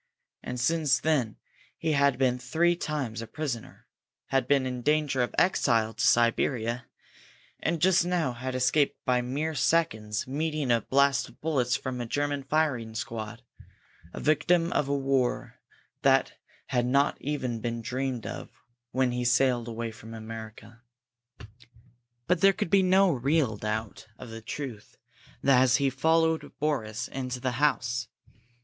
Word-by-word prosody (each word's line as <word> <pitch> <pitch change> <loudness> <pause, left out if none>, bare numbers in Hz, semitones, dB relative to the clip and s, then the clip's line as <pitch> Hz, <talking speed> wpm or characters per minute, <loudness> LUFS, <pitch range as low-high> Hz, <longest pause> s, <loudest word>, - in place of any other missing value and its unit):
And 125 0 -5
since 145 -1 +2
then 130 -6 0 0.4
he 160 - -1
had 140 -3 +3
been 125 -1 +1
three 165 +8 +1
times 140 -9 -3
a 115 - -7
prisoner, 130 -4 -5 0.4
had 135 0 +1
been 140 -2 +3
in 125 -1 -3
danger 150 -1 +1
of 120 - -2
exile 115 -11 +2
to 110 - -3
Siberia, 120 +1 +2 0.7
and 165 0 -1
just 180 0 +4
now 175 -7 0
had 130 +2 -5
escaped 130 +3 +2
by 125 -1 +2
mere 145 +6 -2
seconds 120 -6 0
meeting 150 0 -1
a 115 -1 +3
blast 140 +3 +2
of - - -20
bullets 130 -6 +1
from 130 -1 -4
a 120 - -4
German 145 +2 -1
firing 135 -6 -1
squad, 110 +1 -5 0.7
a - - -7
victim 165 +3 +2
of 145 - +1
a 140 - +1
war 135 -2 -1 0.4
that - - +3 0.4
had 125 -1 +1
not 140 +3 +2
even 130 -5 -2
been 115 0 -4
dreamed 130 -1 -3
of - - -6 0.4
when 130 0 +1
he 125 - -3
had 125 - 0
sailed 120 -2 +1
from 115 +1 -11
America! 110 0 -9 1.4
But 180 -1 +1
there 195 0 +6
could 180 - -3
be 195 - +6
no 190 0 +4
real 135 -3 +1
doubt 105 +1 -4
of 120 - -10
the 115 0 -8
truth 120 -2 -7 0.5
as 130 -2 +5
he 140 -2 +2
followed 160 +3 +1
Boris 120 -7 -1
into 125 -1 -4
the 130 0 -1
house. 125 -4 +1
130 Hz, 150 wpm, -28 LUFS, 120-150 Hz, 1.4 s, there